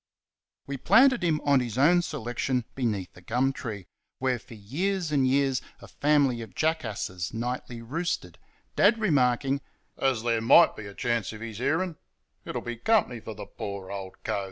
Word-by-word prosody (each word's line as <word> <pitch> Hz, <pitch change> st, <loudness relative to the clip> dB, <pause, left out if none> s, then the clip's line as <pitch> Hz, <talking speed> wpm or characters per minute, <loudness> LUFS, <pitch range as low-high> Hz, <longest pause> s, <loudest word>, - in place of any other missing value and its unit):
We 140 Hz, 0 st, -4 dB
planted 260 Hz, -, +5 dB
him 160 Hz, -3 st, +2 dB
on 140 Hz, -2 st, +4 dB
his 120 Hz, -2 st, -3 dB
own 170 Hz, +6 st, +5 dB
selection 125 Hz, -4 st, -2 dB
beneath 105 Hz, -8 st, -2 dB
a 90 Hz, -, -14 dB
gum 125 Hz, +7 st, +1 dB
tree, 105 Hz, -8 st, -6 dB, 0.3 s
where 130 Hz, -2 st, 0 dB
for 115 Hz, -, -13 dB
years 165 Hz, -, -2 dB
and 135 Hz, -3 st, +3 dB
years 135 Hz, -1 st, +2 dB, 0.2 s
a -, -, -12 dB
family 140 Hz, -5 st, +2 dB
of 115 Hz, -, -10 dB
jackasses 110 Hz, -, -2 dB
nightly 120 Hz, 0 st, -4 dB
roosted, 135 Hz, -, -3 dB, 0.4 s
Dad 210 Hz, +3 st, +5 dB
remarking: 140 Hz, -, +2 dB, 0.4 s
"As 130 Hz, -5 st, +1 dB
there 115 Hz, -1 st, +1 dB
MIGHT 160 Hz, +9 st, +6 dB
be 105 Hz, -, -8 dB
a 100 Hz, -, -10 dB
chance 120 Hz, -3 st, -1 dB
of 110 Hz, -, -9 dB
his 115 Hz, -2 st, -6 dB
hearin', 160 Hz, +5 st, 0 dB, 0.5 s
it'll -, -, -4 dB
be 120 Hz, 0 st, -5 dB
company 165 Hz, -, +2 dB
for 110 Hz, 0 st, -8 dB
the 105 Hz, -, -7 dB
poor 100 Hz, -2 st, -7 dB
old 95 Hz, -1 st, -6 dB
cove." -, -, -1 dB
125 Hz, 170 wpm, -27 LUFS, 110-150 Hz, 0.5 s, MIGHT